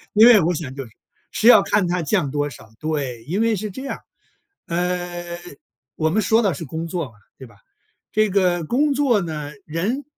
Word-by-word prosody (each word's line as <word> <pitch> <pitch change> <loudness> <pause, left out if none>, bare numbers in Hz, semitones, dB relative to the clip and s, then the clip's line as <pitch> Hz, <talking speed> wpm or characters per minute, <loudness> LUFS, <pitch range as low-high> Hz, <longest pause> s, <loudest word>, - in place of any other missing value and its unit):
因 220 +2 +8
为 235 -4 +8
我 170 +2 +1
想 145 -5 -5
就 135 - -6
是 115 - -15 0.4
是 - - -1
要 220 -5 +9
看 200 -1 +1
它 175 0 -1
降 160 -3 0
多 145 0 -1
少， 110 -4 -13
对。 140 -7 -3
因 180 - -2
为 230 -1 +2
是 210 +2 -4
这 260 +8 -8
样， 275 - -5 0.7
呃， 175 0 -3 0.6
我 160 - +1
们 215 +6 +1
说 225 +3 +3
的 195 -6 +1
是 165 - -6
工 160 +3 -5
作 170 -2 -3
嘛， 130 - -15 0.3
对 130 - -10
吧？ 110 -4 -19 0.6
这 215 -1 +2
个 180 -3 +2
工 280 - +1
作 260 -6 +2
呢， 155 -4 -5
人 195 - -2
175 Hz, 210 characters per minute, -21 LUFS, 155-215 Hz, 0.7 s, 要